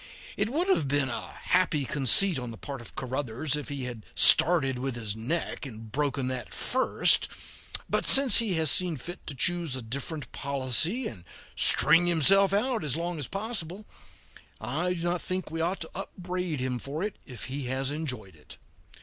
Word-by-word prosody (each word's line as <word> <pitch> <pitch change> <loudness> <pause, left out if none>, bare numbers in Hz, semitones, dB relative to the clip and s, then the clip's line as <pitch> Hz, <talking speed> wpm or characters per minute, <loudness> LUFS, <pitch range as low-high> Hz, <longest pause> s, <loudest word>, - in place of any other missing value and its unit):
It 205 +2 -1
would 325 +9 -1
have 160 - +1
been 140 -1 0
a 120 - -6
happy 170 -6 +1
conceit 145 - +3
on 125 -1 -6
the 115 - -9
part 140 0 -8
of 120 - -14
Caruthers 135 +2 -3
if 150 - -6
he 140 -2 -5
had 120 -3 -7
started 135 -7 +6
with 130 -1 -3
his 110 -3 -4
neck 125 +10 -3
and 110 -3 -11
broken 140 -1 -1
that 130 -2 -6
first; 260 +1 +2 0.6
but - - -1
since 270 -5 +7
he 215 -6 +1
has 160 -3 +2
seen 180 -4 0
fit 175 +8 -9
to 145 - -5
choose 170 +1 +1
a 130 - -5
different 140 +6 -6
policy 140 - +1
and 95 -7 -9 0.3
string 170 +3 +5
himself 190 +4 +5
out 225 +3 0
as 150 -1 -1
long 170 -1 -3
as 145 - -4
possible, 200 -2 -4 0.7
I 160 +11 -2
do 170 - -6
not 175 0 -1
think 185 -3 -4
we 165 0 -3
ought 180 +3 -2
to 160 - -6
upbraid 180 -4 -5
him 125 -1 -2
for 145 +8 -5
it 210 -1 -4
if 125 -4 -9
he 135 +1 -5
has 130 +2 -2
enjoyed 130 - -4
it. 75 - -14
150 Hz, 185 wpm, -27 LUFS, 130-180 Hz, 0.7 s, since